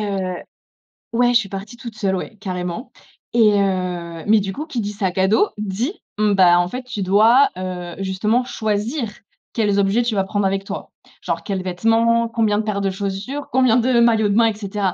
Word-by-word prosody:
heu 190 -3 -2 0.8
ouais, 245 +1 +3
je 240 - +6
suis 200 -4 -5
partie 200 +4 -7
toute 235 -3 -9
seule, 195 -3 0
ouais, 215 +4 -6
carrément. 180 +2 -5 0.4
Et, 220 -3 +5
heu, 180 -4 -2
mais 215 0 +5
du 195 -1 -3
coup 300 - -5
qui 315 -7 -4
dit 205 0 -4
sac 190 -3 -2
à 190 0 +3
dos, 220 - +3
dit: 210 - -2 0.2
mmh, 210 -1 +2
bah, 175 -2 +5
en 175 - +1
fait 250 +7 -6
tu 235 -5 -5
dois, 220 +8 +5
heu, 180 -2 -5
justement 210 +6 0
choisir 220 +3 -2 0.4
quels 205 -3 +1
objets 200 +4 +2
tu 235 -2 -1
vas 195 - +2
prendre 205 +1 -1
avec 195 0 0
toi. - - -7 0.3
Genre - - -3
quels 195 -2 -3
vêtements, 230 +5 +2
combien 220 -3 +1
de 215 - 0
paires 210 -2 -2
de 195 - 0
chaussures, 200 +8 -4
combien 255 -2 +4
de 245 0 +3
maillots 225 -3 +3
de 200 - +1
bains 230 - +5
et 225 - 0
cetera. 200 -2 -2
205 Hz, 205 wpm, -20 LUFS, 190-230 Hz, 0.8 s, je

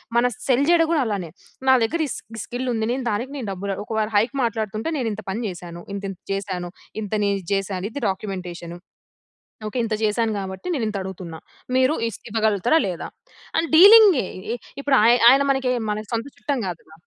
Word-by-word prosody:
మనం 245 +1 +4 0.2
సెల్ 260 +1 +3
చేయడం 335 -1 +5
కూడా 315 - +3
అలానే. 195 -6 -3 0.4
నా 260 - +7
దగ్గర 325 +9 -1
ఈ - - -8
స్కి 225 0 -10
స్కిల్ 250 +1 -4
ఉంది. 220 -1 -1
నేను 260 +1 -2
దానికి 235 +6 -2
నేను 235 -6 -5
డబ్బులు, 195 +1 -3
ఒకవేళ 220 0 -1
హైక్ 230 +5 +2
మాట్లాడుతుంటే 220 +4 -2
నేను 240 -4 -1
ఇంత 215 0 -6
పని 215 +5 -2
జేసాను. 175 -1 -8
ఇంత 200 - -5
ఇంత 185 - -12
చేసాను. 185 -3 -4 0.3
ఇంత 210 -1 -6
నేను 200 0 +2
ఇది - - -18
చేసాను. 195 -1 -2
ఇది 285 - -6
డాక్యుమెంటేషను. 180 -3 -5 0.9
ఓకే. 215 - -5
ఇంత 220 - -2
జేసాను 220 +1 +1
కాబట్టి, 190 - -6
నేను 235 -6 -1
ఇంత 210 - -4
అడుగుతున్నా. 180 -4 -7 0.4
మీరు 260 +4 +3
ఇస్ 205 - -10
ఇవ్వగలుగుతారా? 220 - +2
లేదా? 175 -2 -4 0.5
అని 330 0 +1
డీలింగే. 395 - +8 0.5
ఇప్పుడు 280 -1 +2
ఆయ్ 235 +2 +6
ఆయన 270 +2 +6
మనకే 265 -2 +1 0.2
మన 210 - -2
సొంత 230 +3 -1
చుట్టం 280 -4 -2
గాదుగ. 160 -2 -8
220 Hz, 185 wpm, -23 LUFS, 190-255 Hz, 0.9 s, డీలింగే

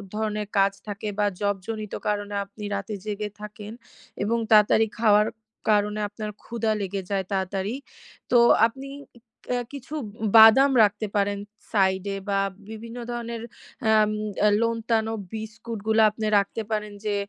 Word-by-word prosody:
ধরনের 210 -1 -2
কাজ 195 0 +4
থাকে 205 +1 -4
বা 205 - +3 0.2
জবজনিত 205 +1 -3
কারণে 205 0 -2
আপনি 205 +2 -12
রাতে 200 +2 -4
জেগে 210 0 -3
থাকেন 210 0 -8 0.5
এবং 230 +3 +1
তাড়াতাড়ি 215 +1 +6
খাওয়ার 210 -1 +5 0.4
কারণে 210 0 +2
আপনার 210 +1 -6
ক্ষুধা 225 -2 -1
লেগে 195 0 -3
যায়, 195 -2 -1
তাড়াতাড়ি। 195 +3 -2 0.6
তো 245 - +6 0.3
আপনি 270 +4 -10 0.6
ক্যা 245 -1 0
কিছু 280 +1 -9 0.4
বাদাম 225 +6 +8
রাখতে 210 +1 +1
পারেন 200 0 +1 0.3
সাইড 190 -2 +2
এ - - -3
বা 195 0 +2 0.3
বিভিন্ন 230 +2 -8
ধরনের 235 -1 -4 0.4
অ্যাম 215 -1 +4 0.4
আ - - +7
নোনতা 225 -1 0 0.2
বিস্কুটগুলো 220 0 -2
আপনি 215 +1 -5
রাখতে 200 +3 0
পারেন 210 -1 -2
যে, 210 - 0
215 Hz, 135 wpm, -25 LUFS, 205-225 Hz, 0.6 s, বাদাম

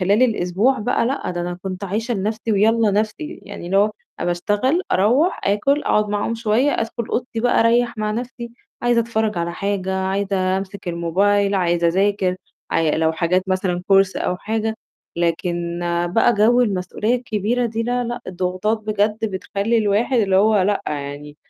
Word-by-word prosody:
خلال 200 +6 +3
الأسبوع 215 +2 +2
بقى 230 +1 0
لأ، 270 -6 -2
ده 175 - -3
أنا 175 0 -4
كنت 190 +1 -5
عايشة 225 +5 -2
لنَفْسي 215 +3 -2
ويالّا 220 +2 +3
نَفْسي، 215 +10 -2
يعني 200 -3 -9
اللي 190 - 0
هو 205 +2 +4 0.3
أنا - - -1
باشتغل، 205 - +1
أروّح، 245 - +2
آكُل، 275 +9 +1
أقعد 210 0 +2
معاهم 210 +2 -1
شوية، 230 +5 +1
أدخُل 230 0 -3
أوضتي 240 -2 -2
بقى 245 +1 +3
أريّح 240 +1 +2
مع 215 0 -1
نَفْسي، 235 +1 -5 0.3
عايزة 240 -1 +3
أتفرّج 220 -4 -1
على 170 0 -2
حاجة، 190 0 -2
عايزة 190 0 0
أمسك 195 -1 -7
الموبايل، 195 +4 +1
عايزة 175 -2 +1
أذاكر، 190 +1 +1 0.3
عاي 160 -1 +1
لو 160 0 +2
حاجات 175 +3 +1
مثلًا 185 -2 -1
كورس 195 -1 +4
أو 180 - -1
حاجة، 220 +2 -2 0.4
لكن 170 0 -1 0.3
بقى 235 +1 +4
جَوّ 230 +4 +4
المسؤولية 210 +2 -1
الكبيرة 235 0 -1
دي 225 0 -3
لا، 245 +1 -1
لأ، 240 +1 -4
الضغوطات 185 +4 -1
بجد 215 0 0
بتخلّي 200 +4 -1
الواحد 220 +4 +1
اللي 195 -4 +2
هو 210 0 +4
لأ، 205 +2 0
يعني 145 0 -5
205 Hz, 165 wpm, -20 LUFS, 185-230 Hz, 0.4 s, هو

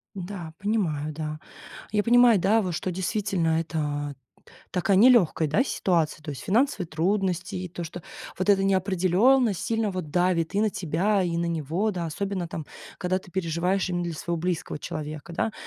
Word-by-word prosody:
Да, 180 -3 -6
понимаю, 170 -8 -1
да. 155 0 -5 0.5
Я 210 -1 +2
понимаю, 240 -1 +6
да, 210 +5 +3
вот 180 -3 -2
что 180 +2 -2
действительно 185 -3 0
это 145 -3 -3
т 140 - -27 0.5
такая 185 +1 +2
нелёгкая, 200 - +5
да, 205 - +2
ситуация, 165 - 0
то 150 - -6
есть 140 - -6
финансовые 225 - +1
трудности 180 +2 -1
и 180 0 -4
то, 175 +1 -6
что 170 +1 -7 0.4
вот 185 +3 -1
эта 195 -1 +5
неопределённость 195 +4 +3
сильно 225 -2 0
вот 180 -5 -5
давит 175 -1 +1
и 205 - +2
на 215 - +2
тебя, 190 +4 0
и 170 -2 -1
на 170 - 0
него, 170 +6 -1
да. 175 -2 -3
Особенно 190 +2 -3
там, 160 - -5 0.3
когда 185 +1 0
ты 185 - -16
переживаешь 180 +2 0
именно 175 -1 -1
для 170 - -3
своего 170 +2 -3
близкого 170 -2 -2
человека, 155 +1 -6
да. 215 +6 -1
180 Hz, 175 wpm, -26 LUFS, 165-200 Hz, 0.5 s, понимаю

